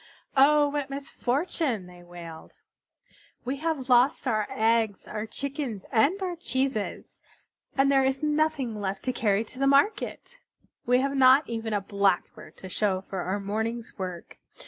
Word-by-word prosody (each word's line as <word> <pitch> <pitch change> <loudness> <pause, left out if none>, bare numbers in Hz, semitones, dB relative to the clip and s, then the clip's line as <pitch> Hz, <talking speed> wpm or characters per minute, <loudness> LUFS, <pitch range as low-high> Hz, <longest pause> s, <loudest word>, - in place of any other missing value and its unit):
"Oh, 290 +2 +5
what 290 -1 -3
misfortune!" 275 - -2
they 180 0 -14
wailed. 170 -2 -11 0.9
"We 265 +3 -2
have 305 -3 -2
lost 250 +3 +4
our 215 -3 +1
eggs, 220 -2 +1
our 215 +1 -4
chickens, 275 -4 -5
and 280 - +3
our 360 -2 -2
cheeses, 260 -8 -3 0.6
and 275 +1 +4
there 270 -1 +4
is 265 +2 0
nothing 300 -7 0
left 195 0 -3
to 255 - -1
carry 210 -3 +1
to 255 +5 -2
market. 420 - +1 0.5
We 250 +1 +4
have 275 +1 -1
not 265 +2 +6
even 225 -1 -4
a 205 -1 0
Blackbird 200 -2 -1
to 190 - -9
show 190 0 0
for 190 0 -6
our 185 +3 -2
morning's 220 +3 -3
work. 180 -2 -6
245 Hz, 145 wpm, -27 LUFS, 205-275 Hz, 0.9 s, not